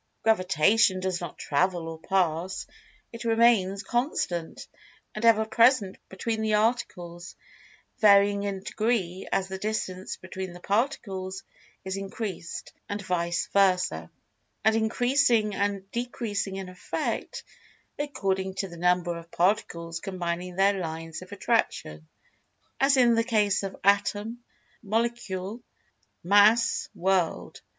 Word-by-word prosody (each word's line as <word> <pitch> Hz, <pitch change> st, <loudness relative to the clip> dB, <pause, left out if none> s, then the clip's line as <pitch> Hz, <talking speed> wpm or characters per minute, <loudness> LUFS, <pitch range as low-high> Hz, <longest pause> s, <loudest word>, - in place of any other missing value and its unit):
Gravitation 190 Hz, -1 st, +3 dB
does 185 Hz, -1 st, -2 dB
not 170 Hz, -3 st, -6 dB
"travel" 165 Hz, +3 st, 0 dB
or 165 Hz, -1 st, -7 dB
"pass"—it 185 Hz, +6 st, -3 dB
remains 225 Hz, -4 st, +3 dB
constant, 235 Hz, -, -2 dB, 0.5 s
and 215 Hz, -, -6 dB
ever 220 Hz, -1 st, +5 dB
present 225 Hz, -2 st, +3 dB
between 220 Hz, +4 st, -3 dB
the 215 Hz, -1 st, +2 dB
articles, 180 Hz, -6 st, -2 dB, 0.6 s
varying 200 Hz, -1 st, +5 dB
in 200 Hz, -1 st, -3 dB
degree 205 Hz, -5 st, -1 dB
as 190 Hz, -, +1 dB
the 190 Hz, 0 st, -6 dB
distance 190 Hz, -3 st, -3 dB
between 185 Hz, -1 st, -7 dB
the 175 Hz, -, -11 dB
Particles 195 Hz, -3 st, -2 dB, 0.4 s
is 190 Hz, +1 st, -3 dB
increased, 195 Hz, -3 st, -6 dB, 0.2 s
and 205 Hz, -, -3 dB
vice 170 Hz, -2 st, -1 dB
versa; 180 Hz, -, +2 dB, 0.6 s
and 220 Hz, 0 st, +5 dB
increasing 235 Hz, 0 st, +2 dB
and 200 Hz, -1 st, -1 dB
decreasing 230 Hz, -5 st, -3 dB
in 195 Hz, -1 st, -5 dB
effect, 185 Hz, +2 st, -4 dB, 0.6 s
according 190 Hz, -10 st, -2 dB
to 195 Hz, -, -2 dB
the 170 Hz, -, -10 dB
number 180 Hz, 0 st, +1 dB
of 170 Hz, 0 st, -10 dB
Particles 170 Hz, -3 st, 0 dB
combining 180 Hz, -1 st, -4 dB
their 195 Hz, +1 st, +3 dB
lines 165 Hz, -1 st, -5 dB
of -, -, -12 dB
Attraction, 75 Hz, 0 st, -1 dB, 0.7 s
as 275 Hz, 0 st, +4 dB
in 240 Hz, -2 st, +5 dB
the 230 Hz, 0 st, +3 dB
case 210 Hz, -4 st, +2 dB
of 195 Hz, -1 st, -5 dB
Atom, 205 Hz, +3 st, +1 dB, 0.4 s
Molecule, 225 Hz, -2 st, -2 dB, 0.6 s
Mass, 205 Hz, +5 st, +4 dB
World. 185 Hz, -2 st, 0 dB
195 Hz, 115 wpm, -27 LUFS, 180-220 Hz, 0.7 s, ever